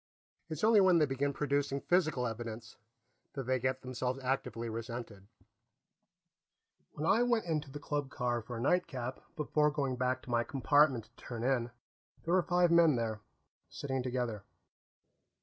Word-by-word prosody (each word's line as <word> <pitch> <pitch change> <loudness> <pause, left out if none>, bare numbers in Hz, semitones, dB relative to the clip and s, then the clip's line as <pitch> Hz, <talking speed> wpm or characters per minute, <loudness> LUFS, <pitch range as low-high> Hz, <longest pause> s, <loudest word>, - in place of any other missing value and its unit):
It's 155 +2 -5
only 220 -1 +6
when 185 -2 +5
they 155 - +5
begin 140 +1 -1
producing 140 -1 0
physical 155 -7 +1
evidence 115 0 -6 0.6
that 135 - -4
they 130 +1 0
get 130 +1 -1
themselves 130 0 -2
actively 120 -3 -2
resented. 115 -3 -6 1.7
When 150 - -4
I 220 +7 +4
went 240 -4 +2
into 155 -4 -2
the 140 - -7
club 145 -1 -3
car 120 -2 -1
for 115 +2 -7
a - - -4
nightcap 135 -5 0 0.2
before 150 0 +2
going 140 -4 -2
back 130 0 0
to 125 - -8
my 120 0 +2
compartment 140 -1 +3
to 120 - -25
turn 120 -2 -5
in, 125 -2 +1 0.5
there 170 - 0
were 185 - +5
five 175 -1 +2
men 170 -4 +6
there, 110 -2 -2 0.5
sitting 135 -2 -3
together. 125 -4 -2
130 Hz, 155 wpm, -33 LUFS, 120-150 Hz, 1.7 s, only